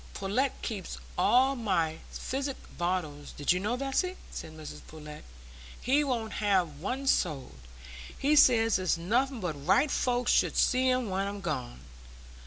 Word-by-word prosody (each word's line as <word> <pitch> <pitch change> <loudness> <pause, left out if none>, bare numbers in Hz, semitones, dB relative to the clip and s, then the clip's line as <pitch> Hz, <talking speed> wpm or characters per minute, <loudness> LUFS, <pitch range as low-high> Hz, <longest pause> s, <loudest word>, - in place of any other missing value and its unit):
"Pullet 230 +8 0
keeps 200 -6 -4 0.2
all 255 +9 +4
my 170 -9 0
physic 270 +1 -3 0.2
bottles, 170 -5 -3
did 145 - +1
you 180 - +2
know, 215 +6 -1
Bessy?" 275 +8 -1 0.2
said 160 - -7
Mrs 155 -1 -9
Pullet. 150 -1 -10 0.6
"He 280 +4 +2
won't 235 -6 -2
have 185 -8 +1
one 255 - -3
sold. 140 - 0 0.6
He 295 +2 +2
says 225 -7 +5
it's 185 -2 +1
nothing 240 +8 0
but 175 -4 -2
right 230 +10 +4
folks 245 -1 +1
should - - +2
see 255 0 +3
'em 255 -5 0
when 195 +1 0
I'm 200 0 -5
gone. - - -4
205 Hz, 150 wpm, -29 LUFS, 170-255 Hz, 0.6 s, says